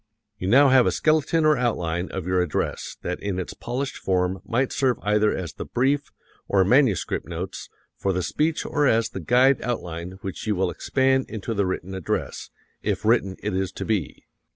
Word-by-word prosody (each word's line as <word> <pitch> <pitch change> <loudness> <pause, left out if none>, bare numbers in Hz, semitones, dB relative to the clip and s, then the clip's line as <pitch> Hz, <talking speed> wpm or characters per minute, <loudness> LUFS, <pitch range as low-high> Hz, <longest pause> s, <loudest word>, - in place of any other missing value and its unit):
You 90 - -3
now 135 +7 +6
have 130 -2 +5
a - - +3
skeleton 155 +1 +2
or 155 0 +5
outline 90 -8 -1
of 95 -3 -5
your 90 0 +2
address 90 -4 -2
that 90 - -3
in 100 -2 -3
its 90 - -4
polished 130 +3 -4
form 90 0 0
might 130 +3 0
serve 130 -3 +1
either 105 +1 +3
as 85 -5 -4
the - - -6
brief, 140 +3 0 0.4
or 95 -2 +3
manuscript 125 - +2
notes, 90 +2 -6 0.3
for 95 - 0
the 90 -1 -1
speech 155 - 0
or 145 -1 +1
as 115 -2 +2
the - - -6
guide 125 - +4
outline 90 -7 -4
which 95 +2 -6
you 105 - +1
will 95 -1 0
expand 130 0 +1
into 110 +1 -4
the 100 -3 0
written 95 0 -4
address, 95 -4 -3 0.3
if 100 -1 -2
written 110 -4 +2
it 105 -1 -1
is 95 0 -1
to - - -5
be. 105 -8 -2
105 Hz, 190 wpm, -24 LUFS, 95-130 Hz, 0.4 s, now